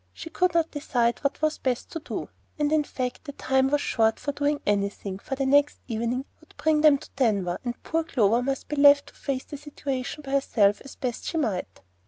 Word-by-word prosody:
She 325 Hz, -, -9 dB
could 360 Hz, 0 st, +1 dB
not 330 Hz, -1 st, +2 dB
decide 245 Hz, -5 st, 0 dB
what 280 Hz, +2 st, -2 dB
was 310 Hz, 0 st, +1 dB
best 255 Hz, -2 st, -2 dB
to 330 Hz, -, -4 dB
do; -, -, -5 dB, 0.3 s
and 295 Hz, -1 st, +1 dB
in 310 Hz, -1 st, +3 dB
fact 255 Hz, 0 st, -4 dB
the 285 Hz, -, -7 dB
time 265 Hz, -1 st, +1 dB
was 290 Hz, +1 st, +1 dB
short 225 Hz, -1 st, +1 dB
for 285 Hz, -, -2 dB
doing 290 Hz, +1 st, 0 dB
anything, 200 Hz, -1 st, -1 dB
for 270 Hz, -, -4 dB
the 270 Hz, 0 st, -1 dB
next 285 Hz, +2 st, +4 dB
evening 235 Hz, +3 st, -2 dB
would -, -, -23 dB
bring 310 Hz, -1 st, +2 dB
them 300 Hz, -2 st, +6 dB
to -, -, -14 dB
Denver, 200 Hz, -9 st, +1 dB
and 240 Hz, -1 st, -5 dB
poor 325 Hz, 0 st, 0 dB
Clover 235 Hz, -7 st, +2 dB
must 270 Hz, +1 st, -2 dB
be 295 Hz, -, -4 dB
left 285 Hz, 0 st, +6 dB
to -, -, -21 dB
face 265 Hz, -2 st, -3 dB
the 290 Hz, -, -8 dB
situation 280 Hz, -1 st, -5 dB
by 270 Hz, -, -6 dB
herself 215 Hz, -7 st, +2 dB
as 275 Hz, -, -11 dB
best 250 Hz, -4 st, -4 dB
she 330 Hz, -, -2 dB
might. 215 Hz, -, -2 dB
275 Hz, 220 wpm, -26 LUFS, 240-295 Hz, 0.3 s, them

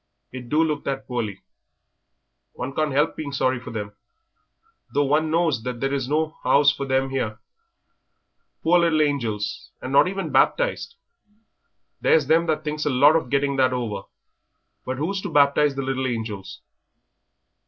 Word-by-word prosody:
It 125 Hz, -2 st, -9 dB
do 155 Hz, +2 st, +3 dB
look 150 Hz, -3 st, -2 dB
that 135 Hz, -1 st, -3 dB
poorly. 110 Hz, -6 st, -4 dB, 1.1 s
One 130 Hz, +2 st, -5 dB
can't 155 Hz, 0 st, 0 dB
'elp 145 Hz, +4 st, +1 dB
being 150 Hz, -2 st, -5 dB
sorry 130 Hz, -2 st, 0 dB
for 125 Hz, -, -9 dB
them, 105 Hz, -2 st, -5 dB, 1.0 s
though 145 Hz, 0 st, +2 dB
one 150 Hz, +3 st, +1 dB
knows 165 Hz, -6 st, +1 dB
there 125 Hz, +3 st, -3 dB
is 135 Hz, -2 st, -2 dB
no 155 Hz, +1 st, -1 dB
'ouse 140 Hz, 0 st, +4 dB
for 140 Hz, -1 st, -4 dB
them 135 Hz, 0 st, 0 dB
'ere. 110 Hz, -5 st, -2 dB, 1.2 s
Poor 175 Hz, +2 st, +4 dB
little 165 Hz, -3 st, +3 dB
angels, 115 Hz, -8 st, -2 dB
and 130 Hz, -, -6 dB
not 140 Hz, -, +6 dB
even 190 Hz, -4 st, -3 dB
baptised. 480 Hz, -, +1 dB, 1.1 s
There's 155 Hz, -3 st, +4 dB
them 165 Hz, +4 st, +3 dB
that 155 Hz, -1 st, 0 dB
thinks 150 Hz, 0 st, -3 dB
a -, -, +2 dB
lot 140 Hz, +4 st, +5 dB
of 155 Hz, -6 st, 0 dB
getting 140 Hz, 0 st, 0 dB
that 130 Hz, -1 st, +3 dB
over. 110 Hz, -6 st, -4 dB, 0.8 s
But 130 Hz, 0 st, -2 dB
who's 190 Hz, +7 st, -2 dB
to 200 Hz, -, -5 dB
baptise 145 Hz, -1 st, +3 dB
the 135 Hz, -, -3 dB
little 130 Hz, 0 st, -1 dB
angels?" 110 Hz, -5 st, -5 dB
140 Hz, 155 wpm, -23 LUFS, 130-155 Hz, 1.2 s, not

